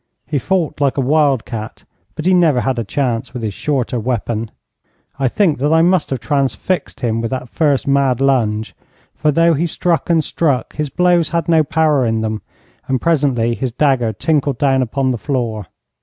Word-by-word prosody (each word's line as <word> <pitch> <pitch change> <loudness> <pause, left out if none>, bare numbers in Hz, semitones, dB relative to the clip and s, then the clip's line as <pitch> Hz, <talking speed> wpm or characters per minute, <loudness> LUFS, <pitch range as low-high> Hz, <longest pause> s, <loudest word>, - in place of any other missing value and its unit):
He 150 -2 -1
fought 165 -1 -1
like 140 -1 +1
a - - +1
wild 140 -2 +2
cat, 110 -1 -7 0.3
but 155 - -5
he 185 - +4
never 160 -8 +3
had 130 -1 -1
a - - -1
chance 120 +1 -2
with 120 - -5
his 105 -2 -2
shorter 130 0 -1
weapon. 115 -1 -2 0.7
I 135 - +2
think 160 - +1
that 145 +3 +1
I 160 0 +4
must 180 -2 +2
have 135 - -2
transfixed 140 +7 -2
him 115 -2 0
with 115 - -2
that 130 -2 -4
first 145 -2 +1
mad 140 -3 +2
lunge, 115 -6 0 0.4
for, 150 - +1
though 165 +3 +3
he 165 +3 0
struck 170 +1 -1
and 165 -2 +3
struck, 145 -6 -1
his 150 -2 -2
blows 175 +2 +2
had 170 -1 -1
no 165 -2 +4
power 155 -3 +2
in 110 -2 0
them, 110 -1 -3 0.5
and 130 -1 0
presently 135 -8 +1
his 130 +1 -3
dagger 130 -3 +1
tinkled 140 +3 0
down 135 -1 +2
upon 130 +2 0
the 120 - -3
floor. 115 - -3
135 Hz, 190 wpm, -17 LUFS, 120-155 Hz, 0.7 s, he